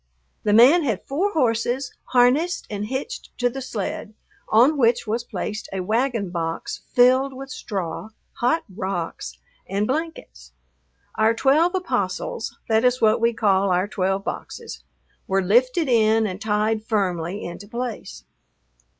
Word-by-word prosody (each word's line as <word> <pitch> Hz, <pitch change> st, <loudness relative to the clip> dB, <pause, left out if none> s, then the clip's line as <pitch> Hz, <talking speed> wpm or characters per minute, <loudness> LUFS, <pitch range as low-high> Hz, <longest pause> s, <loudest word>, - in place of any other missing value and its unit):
The 210 Hz, -, 0 dB
man 250 Hz, +11 st, +7 dB
had 230 Hz, -, -1 dB
four 370 Hz, +9 st, -1 dB
horses 245 Hz, -1 st, 0 dB
harnessed 265 Hz, +8 st, +2 dB
and 205 Hz, 0 st, -3 dB
hitched 265 Hz, -, -5 dB
to 245 Hz, 0 st, +1 dB
the 270 Hz, -, -6 dB
sled, 215 Hz, -3 st, -5 dB, 0.3 s
on 245 Hz, +8 st, +5 dB
which 235 Hz, -4 st, +2 dB
was 225 Hz, +2 st, -2 dB
placed 215 Hz, -2 st, -5 dB
a 190 Hz, -1 st, -3 dB
wagon 225 Hz, -1 st, 0 dB
box 165 Hz, -1 st, -4 dB
filled 255 Hz, +2 st, +4 dB
with 270 Hz, +1 st, -8 dB
straw, 195 Hz, -3 st, -5 dB, 0.3 s
hot 250 Hz, +7 st, +2 dB
rocks, 190 Hz, -3 st, -5 dB, 0.3 s
and 200 Hz, +2 st, 0 dB
blankets. 260 Hz, -, -5 dB, 0.7 s
Our 220 Hz, +1 st, +4 dB
twelve 310 Hz, +9 st, +3 dB
apostles 470 Hz, +6 st, -2 dB
that 220 Hz, 0 st, +2 dB
is 250 Hz, 0 st, +3 dB
what 220 Hz, 0 st, +3 dB
we 235 Hz, 0 st, +4 dB
called 200 Hz, -4 st, +2 dB
our 180 Hz, +2 st, +1 dB
twelve 195 Hz, -1 st, -1 dB
boxes -, -, -7 dB, 0.4 s
were 195 Hz, 0 st, +1 dB
lifted 255 Hz, -, +3 dB
in 225 Hz, -2 st, +3 dB
and 190 Hz, 0 st, -4 dB
tied 215 Hz, +1 st, 0 dB
firmly 190 Hz, -4 st, -1 dB
into 175 Hz, +4 st, -8 dB
place. 220 Hz, -, -6 dB
225 Hz, 140 wpm, -23 LUFS, 200-255 Hz, 0.7 s, man